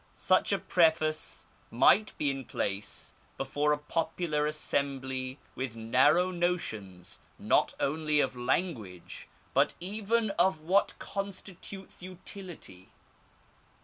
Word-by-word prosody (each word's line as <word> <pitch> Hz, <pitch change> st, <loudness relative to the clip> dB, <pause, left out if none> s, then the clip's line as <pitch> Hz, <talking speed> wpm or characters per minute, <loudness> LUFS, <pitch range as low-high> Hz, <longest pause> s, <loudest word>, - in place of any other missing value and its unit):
Such -, -, +3 dB
a -, -, +3 dB
preface 160 Hz, -2 st, +1 dB, 0.2 s
might 195 Hz, -, +4 dB
be 145 Hz, -2 st, +1 dB
in 135 Hz, -1 st, -5 dB
place 100 Hz, -1 st, -3 dB, 0.2 s
before 150 Hz, +1 st, 0 dB
a 150 Hz, -, +3 dB
popular 150 Hz, 0 st, -1 dB
assembly 135 Hz, -3 st, -2 dB, 0.2 s
with 130 Hz, -3 st, -4 dB
narrow 135 Hz, +11 st, +4 dB
notions 110 Hz, -, -3 dB, 0.2 s
not -, -, +2 dB
only 150 Hz, +1 st, +1 dB
of 135 Hz, -2 st, +1 dB
language 120 Hz, -, -2 dB, 0.3 s
but -, -, +3 dB
even 215 Hz, +4 st, 0 dB
of 190 Hz, -4 st, +4 dB
what 185 Hz, +6 st, +2 dB
constitutes 195 Hz, -1 st, -6 dB
utility. 180 Hz, -, -8 dB
155 Hz, 105 wpm, -30 LUFS, 130-180 Hz, 0.3 s, might